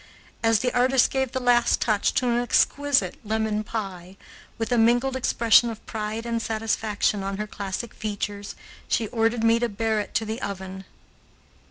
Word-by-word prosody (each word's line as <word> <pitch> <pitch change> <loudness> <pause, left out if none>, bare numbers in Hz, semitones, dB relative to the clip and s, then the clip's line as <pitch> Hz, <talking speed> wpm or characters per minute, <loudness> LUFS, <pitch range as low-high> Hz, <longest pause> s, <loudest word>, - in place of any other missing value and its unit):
As 225 -2 +3
the 250 - 0
artist 255 +1 +3
gave 265 -2 -1
the 260 - -2
last 245 -1 +3
touch 215 -3 +1
to 255 - +1
an 240 0 +2
exquisite 260 -3 +1
lemon 215 0 -1
pie, 195 -4 -6 0.4
with 225 +1 -3
a 245 - +3
mingled 245 +4 +3
expression 235 -2 +4
of 225 -1 -8
pride 220 +1 -4
and 230 -1 -1
satisfaction 220 -2 -1
on 195 0 -3
her 210 - -3
classic 205 +2 -5
features, 205 -1 -5 0.3
she 225 - 0
ordered 225 0 0
me 230 0 +4
to 240 0 0
bear 220 +1 -1
it 210 - -6
to 225 - +1
the 220 +4 -4
oven. 190 -1 -6
225 Hz, 170 wpm, -25 LUFS, 210-240 Hz, 0.4 s, expression